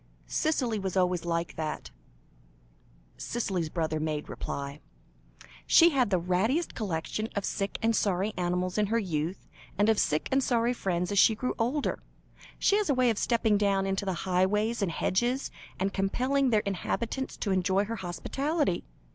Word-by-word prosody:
"Cicely 250 Hz, -8 st, 0 dB
was 190 Hz, -1 st, -3 dB
always 180 Hz, -2 st, +1 dB
like 170 Hz, 0 st, -2 dB
that," 155 Hz, -, -4 dB, 1.3 s
Cicely's 190 Hz, -9 st, -2 dB
brother 160 Hz, -2 st, -1 dB
made 155 Hz, -1 st, -3 dB
reply. 140 Hz, +1 st, -5 dB, 0.9 s
"She 340 Hz, 0 st, +7 dB
had 260 Hz, -6 st, +2 dB
the 190 Hz, -, +3 dB
rattiest 195 Hz, -, 0 dB
collection 210 Hz, +2 st, -3 dB
of 200 Hz, -, -1 dB
sick 195 Hz, 0 st, -2 dB
and 225 Hz, 0 st, +3 dB
sorry 200 Hz, +1 st, +1 dB
animals 180 Hz, +2 st, -1 dB
in 210 Hz, -, +2 dB
her 225 Hz, +3 st, +1 dB
youth, 175 Hz, -4 st, -2 dB, 0.3 s
and 205 Hz, +2 st, +3 dB
of 220 Hz, -, +3 dB
sick 150 Hz, +1 st, +1 dB
and 270 Hz, 0 st, +3 dB
sorry 240 Hz, -1 st, +2 dB
friends 180 Hz, -5 st, -1 dB
as 200 Hz, -, +3 dB
she 220 Hz, -, +6 dB
grew 250 Hz, +4 st, -2 dB
older. 260 Hz, +6 st, 0 dB, 0.6 s
She 405 Hz, -, +3 dB
has 420 Hz, -5 st, 0 dB
a 280 Hz, -, +3 dB
way 250 Hz, -2 st, +4 dB
of 220 Hz, -, -2 dB
stepping 220 Hz, -3 st, +2 dB
down 195 Hz, -2 st, +2 dB
into 195 Hz, +1 st, -1 dB
the 190 Hz, -, 0 dB
highways 210 Hz, +5 st, +1 dB
and 190 Hz, -4 st, 0 dB
hedges, 240 Hz, +11 st, 0 dB, 0.3 s
and 195 Hz, +1 st, 0 dB
compelling 255 Hz, +8 st, +1 dB
their 215 Hz, -3 st, +3 dB
inhabitants 230 Hz, +7 st, -3 dB
to 200 Hz, -, -2 dB
enjoy 190 Hz, +2 st, +2 dB
her 230 Hz, +2 st, -4 dB
hospitality. 275 Hz, -, -1 dB
200 Hz, 165 wpm, -29 LUFS, 180-235 Hz, 1.3 s, She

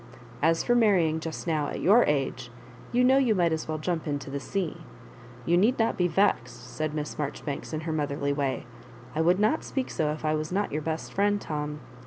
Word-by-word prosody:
As 165 Hz, +2 st, +3 dB
for 240 Hz, -, +2 dB
marrying 185 Hz, -9 st, +3 dB
just 160 Hz, 0 st, -5 dB
now 155 Hz, -4 st, 0 dB
at -, -, -4 dB
your 215 Hz, +7 st, +6 dB
age, 135 Hz, -4 st, -1 dB, 0.4 s
you 245 Hz, +1 st, +3 dB
know 260 Hz, +2 st, +5 dB
you 240 Hz, -5 st, +3 dB
might 175 Hz, -3 st, +2 dB
as 160 Hz, -, -3 dB
well 155 Hz, 0 st, -2 dB
jump 160 Hz, +1 st, -2 dB
into 145 Hz, -2 st, -3 dB
the 140 Hz, -, -3 dB
se& 180 Hz, +2 st, -3 dB, 0.7 s
You 170 Hz, +1 st, +3 dB
need 220 Hz, +8 st, +3 dB
not 225 Hz, 0 st, +1 dB
be 180 Hz, -, +2 dB
vexed," 125 Hz, -10 st, 0 dB
said 155 Hz, -1 st, -2 dB
MLss 150 Hz, -1 st, -4 dB
Maijoribanks 145 Hz, -1 st, -4 dB
in 155 Hz, -1 st, -3 dB
her 160 Hz, 0 st, -3 dB
motherly 140 Hz, -2 st, -1 dB
way. 140 Hz, -3 st, -2 dB, 0.5 s
"I 155 Hz, -, 0 dB
would 175 Hz, +3 st, +3 dB
not 215 Hz, +9 st, +2 dB
speak 265 Hz, -2 st, -3 dB
so 155 Hz, -2 st, 0 dB
if 155 Hz, +1 st, -4 dB
I 155 Hz, -, +2 dB
was 155 Hz, +1 st, -2 dB
not 200 Hz, +2 st, 0 dB
your 155 Hz, -, -2 dB
best 160 Hz, +1 st, -4 dB
friend, 205 Hz, +1 st, +2 dB
Tom. 150 Hz, -3 st, -4 dB
160 Hz, 215 wpm, -27 LUFS, 150-195 Hz, 0.7 s, your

